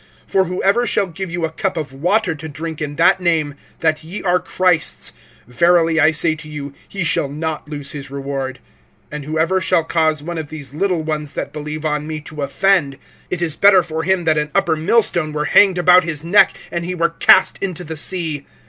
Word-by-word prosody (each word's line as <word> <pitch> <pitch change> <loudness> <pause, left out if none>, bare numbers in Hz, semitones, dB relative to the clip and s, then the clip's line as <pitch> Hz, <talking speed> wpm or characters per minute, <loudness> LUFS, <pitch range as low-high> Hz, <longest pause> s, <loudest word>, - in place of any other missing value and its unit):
(41)For 190 -2 +2
whoever 195 +6 +1
shall 205 - +1
give 190 +1 -6
you 170 -1 -2
a 160 - -4
cup 185 +2 -3
of 145 -4 -4
water 180 +6 +1
to 160 +1 -8
drink 160 +2 -6
in 145 -1 -4
that 170 +3 +3
name, 160 -4 +1 0.3
that 160 -1 +1
ye 175 +6 -6
are 180 -1 +2
Christ's, 180 -4 0 0.3
verily 165 +4 +3
I 155 +1 +6
say 160 0 +1
to 155 0 -10
you, 145 -2 -7 0.2
he 195 -2 -3
shall 145 -3 0
not 155 +1 -4
lose 145 -2 -3
his 140 -2 -7
reward. 135 -1 -4 0.5
(42)And 150 -1 -6
whoever 160 +5 0
shall 165 - +2
cause 155 -2 0
one 170 +1 -4
of 155 -2 -6
these 145 -4 -9
little 175 0 0
ones 150 -2 -3
that - - -5
believe 150 +1 -6
on 150 0 -1
me 155 -1 -4
to 150 0 -8
offend, 140 0 +1 0.3
it 175 -1 -2
is 160 -3 -1
better 195 -2 +5
for 160 -1 -4
him 185 +1 +1
that 155 -2 +2
an 150 0 -2
upper 160 - +2
millstone 165 -2 +1
were 150 0 -1
hanged 190 +4 +5
about 180 +1 +6
his 160 -3 -4
neck, 175 +5 +4
and 170 0 -2
he 180 +1 -4
were 170 -1 +1
cast 190 +3 +4
into 180 -3 -3
the 160 -1 -6
sea. 155 -3 -2
160 Hz, 210 wpm, -18 LUFS, 150-180 Hz, 0.5 s, I